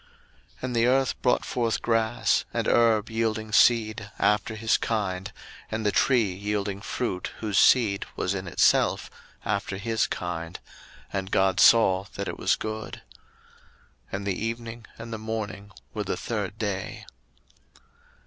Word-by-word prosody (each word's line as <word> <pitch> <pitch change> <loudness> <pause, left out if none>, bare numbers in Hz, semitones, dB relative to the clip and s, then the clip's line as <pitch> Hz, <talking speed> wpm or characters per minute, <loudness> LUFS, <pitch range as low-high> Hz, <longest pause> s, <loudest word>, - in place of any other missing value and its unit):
01:001:012 - - -30
And 125 -1 -2
the 115 0 +3
earth 135 +1 +1
brought 125 - +2
forth 115 -2 -1
grass, 115 0 +1
and - - -1
herb 115 -2 +3
yielding 110 -1 -1
seed 110 -2 +3
after 105 +2 +1
his 110 0 +2
kind, 100 -3 -2 0.4
and 110 0 -3
the 105 - +3
tree 120 -8 +3
yielding 100 0 -3
fruit, 105 -4 -3
whose 105 -3 0
seed 110 -6 +4
was 95 - -1
in 95 -1 -4
itself, 85 - +2 0.3
after 100 -1 -2
his 110 +2 0
kind: 85 -2 -5 0.5
and 95 -1 -2
God 95 -1 +2
saw 95 -5 +6
that - - -4
it - - -5
was - - +3
good. 110 0 -6 1.1
01:001:013 - - -22
And 100 +1 -3
the 100 +1 -2
evening 115 0 -5
and 115 0 -8
the 110 - -4
morning 110 -2 -5 0.2
were - - -2
the - - -3
third - - -3
day. - - -4
110 Hz, 150 wpm, -26 LUFS, 100-115 Hz, 1.1 s, saw